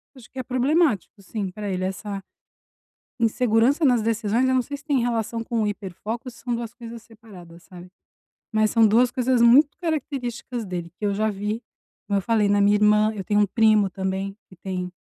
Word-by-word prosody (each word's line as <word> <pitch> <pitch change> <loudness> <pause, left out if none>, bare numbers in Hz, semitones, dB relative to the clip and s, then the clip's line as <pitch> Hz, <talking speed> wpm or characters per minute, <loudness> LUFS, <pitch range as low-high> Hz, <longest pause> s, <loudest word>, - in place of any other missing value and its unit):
acho 255 -3 -16
que 265 - -8
é - - -2
problemático, 255 - +1
sim, 195 0 -5
pra 205 +2 -6
ele. 185 -1 -2
Essa 195 +1 -4 1.0
insegurança 235 +5 +2
nas 245 -5 +4
decisões, 225 +2 +1
eu 260 - +2
não 255 - +3
sei 285 +4 -6
se 285 - -19
tem 290 -3 +1
relação 230 -1 -2
com 230 -1 -1
o - - +1
hiperfoco 205 +2 -5
ou - - -4
se 235 - -17
são 245 -1 -3
2 235 0 -6
coisas 235 -1 -10
separadas, 195 -7 -15
sabe, 180 -1 -12 0.6
mas 215 -1 +2
são 225 -1 +5
2 240 +4 +3
coisas 255 0 +1
muito 265 +6 +5
características 260 - -4
dele 175 -3 -5
que 210 - -4
eu 200 - +1
já 215 +2 0
vi, 210 +2 -3 0.5
como 200 - +1
eu - - 0
falei, 215 -1 +2
na 205 0 +3
minha 205 +1 +4
irmã, 210 +1 +3
eu 195 - -5
tenho 210 +1 +2
um - - +4
primo 215 0 +3
também 190 +1 -3
que 185 - -15
tem, 180 0 -5
220 Hz, 205 wpm, -23 LUFS, 200-240 Hz, 1.0 s, são